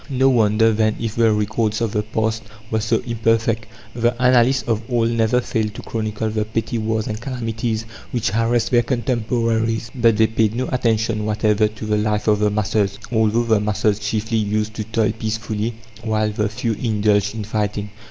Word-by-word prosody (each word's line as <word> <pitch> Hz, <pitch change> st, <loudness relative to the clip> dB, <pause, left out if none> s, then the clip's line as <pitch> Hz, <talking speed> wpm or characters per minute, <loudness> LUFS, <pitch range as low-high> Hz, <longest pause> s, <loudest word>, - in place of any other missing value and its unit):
No 135 Hz, 0 st, +3 dB
wonder, 110 Hz, -2 st, +3 dB
then, 110 Hz, 0 st, +1 dB
if 115 Hz, -1 st, -3 dB
the 115 Hz, -1 st, +4 dB
records 105 Hz, +1 st, 0 dB
of 115 Hz, -3 st, -1 dB
the 105 Hz, -, 0 dB
past 110 Hz, +1 st, -1 dB, 0.3 s
were 110 Hz, -, +1 dB
so 110 Hz, +2 st, 0 dB
imperfect. 115 Hz, -1 st, 0 dB, 0.3 s
The 120 Hz, 0 st, 0 dB
annalists 125 Hz, +1 st, +3 dB
of 115 Hz, -2 st, 0 dB
old 115 Hz, -2 st, +1 dB
never 115 Hz, +2 st, +2 dB
failed 110 Hz, -3 st, -2 dB
to -, -, -8 dB
chronicle 110 Hz, -1 st, -3 dB
the 110 Hz, 0 st, 0 dB
petty 115 Hz, +2 st, -2 dB
wars 110 Hz, 0 st, -1 dB
and 110 Hz, 0 st, -4 dB
calamities 115 Hz, -3 st, -3 dB, 0.2 s
which 120 Hz, -3 st, -1 dB
harassed 115 Hz, +3 st, +1 dB
their 120 Hz, -1 st, +5 dB
contemporaries; 115 Hz, -2 st, -1 dB
but 115 Hz, -4 st, +3 dB
they 110 Hz, -, +5 dB
paid 110 Hz, 0 st, +1 dB
no 130 Hz, +2 st, -1 dB
attention 115 Hz, -3 st, 0 dB
whatever 105 Hz, 0 st, +2 dB
to 110 Hz, +1 st, -8 dB
the 105 Hz, 0 st, +1 dB
life 105 Hz, 0 st, -1 dB
of 105 Hz, -1 st, +3 dB
the 105 Hz, 0 st, +3 dB
masses, 105 Hz, -1 st, 0 dB
although 110 Hz, 0 st, +2 dB
the 110 Hz, -2 st, +2 dB
masses 105 Hz, 0 st, 0 dB
chiefly 110 Hz, +2 st, -1 dB
used 105 Hz, +1 st, -1 dB
to 110 Hz, -, -4 dB
toil 110 Hz, 0 st, +1 dB
peacefully 110 Hz, 0 st, -3 dB, 0.3 s
while 110 Hz, -1 st, 0 dB
the 105 Hz, 0 st, -1 dB
few 110 Hz, +2 st, -2 dB
indulged 105 Hz, -2 st, +1 dB
in 110 Hz, -, -4 dB
fighting. 105 Hz, -1 st, -2 dB
110 Hz, 180 wpm, -20 LUFS, 105-115 Hz, 0.3 s, their